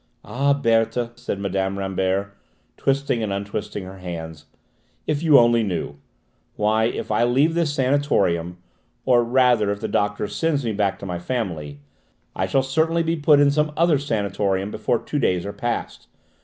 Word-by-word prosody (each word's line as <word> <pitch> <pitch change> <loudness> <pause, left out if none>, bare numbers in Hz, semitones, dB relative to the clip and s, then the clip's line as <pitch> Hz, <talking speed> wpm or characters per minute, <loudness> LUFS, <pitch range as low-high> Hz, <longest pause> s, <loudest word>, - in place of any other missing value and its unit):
"Ah, 140 +3 +1
Berthe," 115 -2 +1
said 120 -4 -4
Mme. 95 0 -2
Rambert, 95 0 -1 0.4
twisting 135 -3 0
and 105 -2 -2
untwisting 100 0 -4
her 95 +1 -10
hands, 80 -4 -7 0.6
"if 150 -1 -1
you 155 -4 +6
only 120 -1 +5
knew! 90 -8 -3 0.6
Why, 110 +1 +2
if 115 - -3
I 105 +2 +2
leave 135 +7 +3
this 165 -4 0
sanatorium, 105 - +1 0.5
or 120 -2 +4
rather 120 -3 +3
if 100 - -4
the 110 - -3
doctor 105 0 -1
sends 150 -2 -1
me 115 - 0
back 100 -1 0
to - - -6
my 90 -2 -4
family, 85 - -4 0.5
I - - -1
shall 135 - +2
certainly 160 +5 +1
be 165 +1 0
put 150 -2 +4
in 145 -1 +5
some 150 +1 +1
other 165 -4 +3
sanatorium 100 -5 -1
before 120 - 0
two 145 - -4
days 90 -8 0
are 100 - -5
past! 120 -1 -4
115 Hz, 165 wpm, -22 LUFS, 95-140 Hz, 0.6 s, you